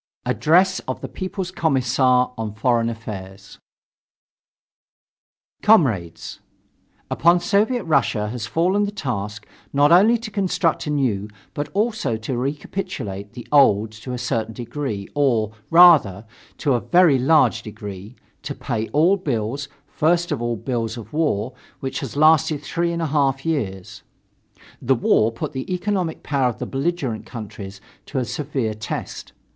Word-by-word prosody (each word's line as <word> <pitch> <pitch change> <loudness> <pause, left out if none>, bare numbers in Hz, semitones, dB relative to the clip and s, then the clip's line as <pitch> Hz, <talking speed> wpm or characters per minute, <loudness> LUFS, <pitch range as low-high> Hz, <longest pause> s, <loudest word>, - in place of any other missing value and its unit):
ADDRESS 185 +4 +3
OF 130 - -3
THE - - -5
PEOPLES 185 -1 -5
COMMISSAR 130 -6 +2
ON 110 -3 -5
FOREIGN 115 0 +1
AFFAIRS 100 -4 -8 2.0
Comrades: 120 - +2 0.7
Upon 170 +2 +4
Soviet 210 +6 +1
Russia 135 -9 +1
has 115 -1 -5
fallen 185 - +1
the 205 - -4
task 105 - -4 0.3
not 145 +2 +4
only 210 +7 +6
to 225 -1 -8
construct 185 -4 0
the - - -3
new 125 -9 0 0.3
but 145 0 -4
also 210 - 0
to 110 +4 -4
recapitulate 130 - -4
the 120 0 -10
old 110 -7 +4
to 110 +4 -9
a 125 - -3
certain 115 -3 -2
degree, 120 -5 -4
or, 120 -7 +1 0.2
rather, 155 - +6 0.3
to 140 - +1
a 120 - +2
very 175 -7 +4
large 130 -4 +3
degree 105 0 -9 0.3
to 145 - -5
pay 115 -4 -3
all 170 +7 +3
bills, 140 - -3 0.2
first 170 +3 +1
of 140 -5 -2
all 120 0 -1
the - - -12
bills 120 -3 -2
of 115 - -10
the - - -9
war, 130 -6 0 0.3
which 135 -1 -4
has 135 -6 -6
lasted 155 -1 +4
three 170 +2 -1
and 170 0 -2
a 155 -2 -3
half 135 -2 +1
years. 100 - -3 0.8
The 130 +2 +2
war 115 -1 +2
put 115 - -5
the 130 +7 -5
economic 180 -2 -2
power 135 -4 +1
of 115 - -6
the - - -4
belligerent 135 -5 -2
countries 100 -4 -8 0.3
to 140 - -5
a 130 - 0
severe 130 -4 -2
test. 110 0 -6
135 Hz, 150 wpm, -22 LUFS, 110-165 Hz, 2.0 s, only